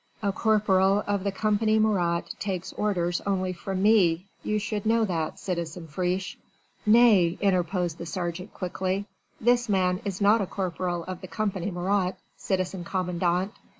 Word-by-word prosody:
"A 200 Hz, -, +2 dB
corporal 200 Hz, -2 st, +3 dB
of 200 Hz, -2 st, -1 dB
the 200 Hz, -, 0 dB
Company 215 Hz, +2 st, +1 dB
Marat 180 Hz, -6 st, +1 dB
takes 190 Hz, -3 st, -3 dB
orders 175 Hz, -4 st, 0 dB
only 185 Hz, -2 st, 0 dB
from 190 Hz, +2 st, -3 dB
me; 190 Hz, -5 st, +4 dB, 0.2 s
you 215 Hz, -, -1 dB
should 210 Hz, 0 st, -3 dB
know 225 Hz, +1 st, +3 dB
that, 165 Hz, -5 st, -2 dB
citizen 170 Hz, -2 st, -4 dB
Friche." 180 Hz, +4 st, -2 dB, 0.5 s
"Nay!" 210 Hz, -6 st, +5 dB
interposed 180 Hz, -3 st, 0 dB
the 170 Hz, -, -6 dB
sergeant 175 Hz, +2 st, -4 dB
quickly, 185 Hz, +2 st, -2 dB, 0.3 s
"this 240 Hz, 0 st, +2 dB
man 185 Hz, -2 st, +1 dB
is 195 Hz, -3 st, -4 dB
not 210 Hz, +2 st, +4 dB
a 195 Hz, -, -2 dB
corporal 180 Hz, -2 st, -2 dB
of 185 Hz, +1 st, -7 dB
the 185 Hz, -, -8 dB
Company 190 Hz, +1 st, -2 dB
Marat, 185 Hz, +1 st, 0 dB, 0.2 s
citizen 185 Hz, -1 st, -2 dB
commandant. 180 Hz, +2 st, -1 dB
190 Hz, 150 wpm, -26 LUFS, 175-205 Hz, 0.5 s, Nay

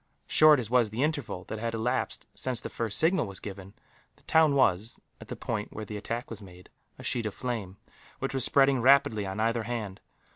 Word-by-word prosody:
Short 155 Hz, -2 st, +6 dB
as 120 Hz, -, -3 dB
was 125 Hz, -3 st, +4 dB
the 115 Hz, +6 st, -1 dB
interval 145 Hz, -, -2 dB
that 110 Hz, -, -6 dB
had 115 Hz, 0 st, -2 dB
elapsed 125 Hz, +3 st, -2 dB
since 130 Hz, -2 st, -2 dB
the -, -, -6 dB
first 115 Hz, -3 st, -2 dB
signal 160 Hz, -, +2 dB
was 100 Hz, -1 st, -8 dB
given, 95 Hz, -1 st, -9 dB, 0.4 s
the -, -, -23 dB
town 160 Hz, -3 st, +4 dB
was, 110 Hz, -5 st, +2 dB, 0.2 s
at -, -, -12 dB
the -, -, -5 dB
point 105 Hz, -2 st, -4 dB
where 110 Hz, -, -6 dB
the 105 Hz, -, -7 dB
attack 115 Hz, +4 st, -5 dB
was 110 Hz, -2 st, -6 dB
made, 90 Hz, -2 st, -14 dB, 0.3 s
a -, -, -11 dB
sheet 115 Hz, -3 st, 0 dB
of 105 Hz, -, -6 dB
flame, 110 Hz, -7 st, -4 dB, 0.4 s
which -, -, -3 dB
was 135 Hz, -2 st, +1 dB
spreading 135 Hz, -1 st, +4 dB
rapidly 115 Hz, -6 st, +4 dB
on 95 Hz, +2 st, -5 dB
either 115 Hz, +1 st, +1 dB
hand. 110 Hz, -4 st, -5 dB
115 Hz, 210 wpm, -28 LUFS, 105-130 Hz, 0.4 s, Short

